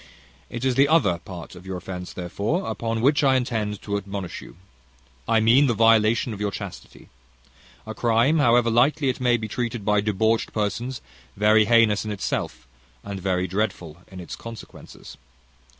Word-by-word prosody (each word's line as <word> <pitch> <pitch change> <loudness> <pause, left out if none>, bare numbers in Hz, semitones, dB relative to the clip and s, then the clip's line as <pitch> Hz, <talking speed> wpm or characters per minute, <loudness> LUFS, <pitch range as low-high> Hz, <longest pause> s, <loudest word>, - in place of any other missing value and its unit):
It 120 +2 -5
is 130 - +2
the 135 +3 +4
other 120 - +2
part 85 -1 -10
of 90 -1 -12
your 95 -1 -4
offence, 90 0 -7
therefore, 100 - -3
upon 115 -1 -3
which 145 +4 +3
I 135 -1 +4
intend 110 -5 -2
to 100 -1 -2
admonish 100 -2 -6
you, - - -13 0.7
I 115 - +3
mean 120 +6 +5
the 120 - +1
violation 115 +1 +3
of 105 - -8
your 105 - 0
chastity; - - -9 0.8
a - - -6
crime, 120 +7 +2
however 120 -3 +3
lightly 135 +4 +2
it 130 - -2
may 120 -1 +3
be 110 -1 -5
treated 120 -1 -4
by 105 -1 +2
debauched 110 +2 0
persons, 115 +4 -3 0.4
very 105 +1 +4
heinous 115 -2 +4
in 110 - -5
itself, 95 -10 -4 0.4
and 100 -1 -6
very 90 -1 0
dreadful 95 -4 -3
in 95 - -11
its 90 - -7
consequences. 115 -2 -11
110 Hz, 165 wpm, -23 LUFS, 100-120 Hz, 0.8 s, mean